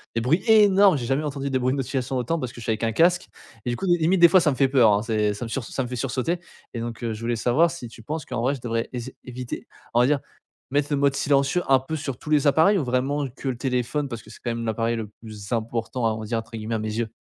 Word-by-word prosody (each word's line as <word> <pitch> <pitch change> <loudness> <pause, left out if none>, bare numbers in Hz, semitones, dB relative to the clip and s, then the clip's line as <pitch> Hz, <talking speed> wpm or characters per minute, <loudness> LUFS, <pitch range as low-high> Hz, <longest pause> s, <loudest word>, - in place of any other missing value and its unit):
des 115 - +1
bruits 150 +10 +2
énormes! 205 -5 +6
J'ai 120 - -4
jamais 135 +4 +1
entendu 140 -2 -3
des 130 -1 0
bruits 130 +1 +1
de - - -2
notifications 130 -1 -2
autant 125 +7 -1
parce 125 -5 -4
que 120 - -10
je - - -8
suis 110 - -1
avec 110 +1 -2
un 115 - -1
casque 175 +6 +3 0.4
et - - -1
du - - -1
coup, 195 - -4
limite 175 0 +2
des 170 - +9
fois 185 - +6
ça 160 - +3
me - - -2
fait 135 0 +3
peur, 120 -6 +5
hein, 100 - +2
c'est 105 -2 +1
ça 105 - -6
me - - -7
surs 125 0 -3
ça 135 - -3
me 125 - -6
fait 125 - -4
sursauter 135 +7 -1 0.3
et 120 - -4
donc 115 +1 -5
heu, 115 - -1
je 110 - -7
voulais 120 +1 -1
savoir 125 +9 +3
si 160 -8 -7
tu 115 - -13
penses 150 +7 -4
qu'en 125 -2 -3
vrai 130 +4 +1
je 130 - -11
devrais 115 -1 -2
ess 125 +1 -5
éviter, 125 -1 -6 0.3
on 120 - +3
va 125 - +4
dire, 145 0 +2 0.5
mettre 145 +1 +1
le 145 - +2
mode 140 -1 +2
silencieux, 140 +5 +2
un 135 -1 +5
peu 135 +5 -5
sur 140 -4 -4
tous 150 - -10
les 150 -1 +3
appareils 160 +8 +5
ou 170 - 0
vraiment 135 +3 0
que 135 +2 -9
le 125 - -3
téléphone, 130 +3 -1
parce 120 -4 -6
que - - -16
c'est 110 - -12
quand 120 - -1
même 115 0 -3
l'appareil 115 +1 0
le 110 -2 -5
plus 105 -3 -10
«important», 115 +1 -2
on - - -7
va - - -6
dire, 115 +1 -1
entre 115 - -11
guillemets 110 +1 -3
à - - -1
mes 110 0 -3
yeux? 115 0 -1
125 Hz, 305 wpm, -24 LUFS, 115-145 Hz, 0.5 s, des